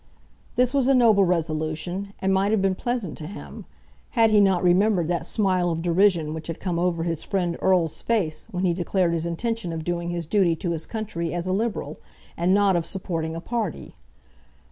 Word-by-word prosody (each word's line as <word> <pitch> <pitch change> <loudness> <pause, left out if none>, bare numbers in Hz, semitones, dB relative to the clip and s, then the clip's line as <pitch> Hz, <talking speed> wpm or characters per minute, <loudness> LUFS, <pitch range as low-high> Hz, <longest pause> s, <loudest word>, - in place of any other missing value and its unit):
This 250 +1 +2
was 275 -3 +2
a 270 - +5
noble 220 -6 +5
resolution, 170 +3 -2
and 190 0 0
might 195 +1 +2
have 220 0 +2
been 195 0 +2
pleasant 235 -4 -3
to 155 - -6
him, 205 - -9 0.5
had 225 -1 +5
he 210 -1 +6
not 190 -3 +3
remembered 180 -1 +3
that 170 -2 -1
smile 185 -4 +1
of 165 0 -2
derision 175 -3 +2
which 160 0 -6
had 165 - -5
come 175 -3 -2
over 170 -2 0
his 165 -2 -2
friend 180 -4 -1
Erle's 180 -4 +2
face 190 -10 -1
when 185 -3 -2
he 175 - +2
declared 175 0 0
his 165 0 -1
intention 225 +2 -2
of 160 -1 -4
doing 170 0 -2
his 170 -1 -3
duty 175 -1 +2
to 170 +2 -3
his 160 -1 -3
country 185 -7 -4
as 175 0 -2
a 185 - 0
Liberal, 220 +2 -2 0.4
and 175 +2 +1
not 200 -1 +4
of 170 - +1
supporting 165 -4 -3
a - - -4
party. 225 -4 -4
180 Hz, 200 wpm, -24 LUFS, 170-200 Hz, 0.5 s, he